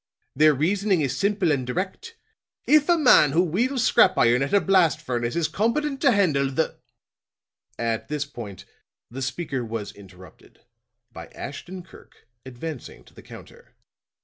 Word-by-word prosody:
Their 155 Hz, +1 st, +4 dB
reasoning 190 Hz, +4 st, +1 dB
is 135 Hz, -2 st, -1 dB
simple 195 Hz, +1 st, 0 dB
and 135 Hz, -3 st, 0 dB
direct. 195 Hz, -, -5 dB, 0.5 s
If 305 Hz, +1 st, +4 dB
a 345 Hz, -, +5 dB
man 245 Hz, -, +5 dB
who 170 Hz, +3 st, +3 dB
wheels 235 Hz, -, -1 dB
scrap -, -, +4 dB
iron 120 Hz, +2 st, +3 dB
at 135 Hz, -, -2 dB
a 200 Hz, -, +4 dB
blast 175 Hz, -3 st, +2 dB
furnace 120 Hz, -5 st, -3 dB
is 170 Hz, -2 st, 0 dB
competent 275 Hz, +6 st, -1 dB
to 275 Hz, -, +4 dB
handle 155 Hz, -, +1 dB
the 140 Hz, +4 st, -2 dB, 0.5 s
" -, -, -45 dB, 0.2 s
At 110 Hz, -, -6 dB
this 150 Hz, -1 st, -3 dB
point 110 Hz, -9 st, -10 dB, 0.5 s
the 135 Hz, +3 st, -7 dB
speaker 135 Hz, 0 st, -3 dB
was 110 Hz, -2 st, -5 dB
interrupted 95 Hz, -2 st, -17 dB, 0.5 s
by -, -, -10 dB
Ashton 180 Hz, +6 st, -9 dB
Kirk 170 Hz, -, -19 dB, 0.2 s
advancing 130 Hz, +3 st, -8 dB
to -, -, -22 dB
the -, -, -14 dB
counter. -, -, -15 dB
155 Hz, 155 wpm, -24 LUFS, 130-200 Hz, 0.5 s, a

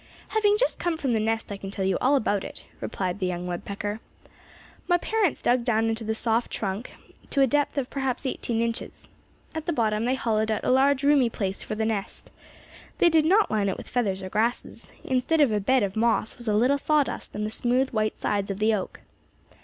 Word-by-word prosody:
"Having 420 Hz, -1 st, +3 dB
just -, -, 0 dB
come 345 Hz, -2 st, -1 dB
from 270 Hz, -6 st, -1 dB
the 220 Hz, -, +2 dB
nest 225 Hz, 0 st, -1 dB
I 200 Hz, -, -4 dB
can 195 Hz, 0 st, -7 dB
tell 195 Hz, -1 st, -3 dB
you 190 Hz, -, +2 dB
all 270 Hz, +3 st, +4 dB
about 205 Hz, -6 st, +1 dB
it," -, -, -9 dB, 0.2 s
replied 185 Hz, 0 st, -3 dB
the 185 Hz, -, 0 dB
young 180 Hz, 0 st, -3 dB
woodpecker. 200 Hz, +4 st, -4 dB, 0.9 s
"My 350 Hz, -, +4 dB
parents 420 Hz, -1 st, 0 dB
dug 245 Hz, 0 st, +3 dB
down 225 Hz, -2 st, +1 dB
into 225 Hz, 0 st, -2 dB
the 220 Hz, 0 st, -2 dB
soft 230 Hz, +1 st, 0 dB
trunk 200 Hz, +3 st, -4 dB, 0.4 s
to 275 Hz, -, +2 dB
a -, -, +7 dB
depth 290 Hz, +2 st, 0 dB
of 265 Hz, -3 st, 0 dB
perhaps 270 Hz, -1 st, -2 dB
eighteen 235 Hz, -3 st, -1 dB
inches. 230 Hz, 0 st, -4 dB, 0.4 s
At 320 Hz, +1 st, -5 dB
the 340 Hz, -, +1 dB
bottom 220 Hz, -3 st, +1 dB
they 255 Hz, +2 st, +2 dB
hollowed 220 Hz, -3 st, 0 dB
out 215 Hz, -, -1 dB
a -, -, +2 dB
large 270 Hz, +1 st, +3 dB
roomy 280 Hz, -4 st, +4 dB
place 195 Hz, -3 st, -3 dB
for 215 Hz, -, -4 dB
the 220 Hz, +1 st, -1 dB
nest. 215 Hz, -3 st, -4 dB, 0.7 s
They 345 Hz, -, +5 dB
did 320 Hz, -2 st, +3 dB
not 400 Hz, +6 st, +4 dB
line 205 Hz, -2 st, +1 dB
it 190 Hz, -, -3 dB
with -, -, -9 dB
feathers 200 Hz, -6 st, -1 dB
or 185 Hz, -, -5 dB
grasses. 230 Hz, +5 st, -2 dB
Instead 260 Hz, +5 st, +1 dB
of 285 Hz, -6 st, +5 dB
a 210 Hz, -, +1 dB
bed 255 Hz, +4 st, +2 dB
of 195 Hz, -1 st, -2 dB
moss 225 Hz, 0 st, +1 dB
was 240 Hz, -, -10 dB
a 210 Hz, -, +2 dB
little 255 Hz, +6 st, +3 dB
sawdust 300 Hz, -1 st, 0 dB
and 210 Hz, 0 st, -2 dB
the 215 Hz, -, -3 dB
smooth 250 Hz, +3 st, +1 dB
white 215 Hz, -1 st, -1 dB
sides 200 Hz, -1 st, -1 dB
of 195 Hz, -, -3 dB
the 215 Hz, +2 st, +2 dB
oak. 195 Hz, -3 st, -4 dB
230 Hz, 220 wpm, -26 LUFS, 210-270 Hz, 0.9 s, a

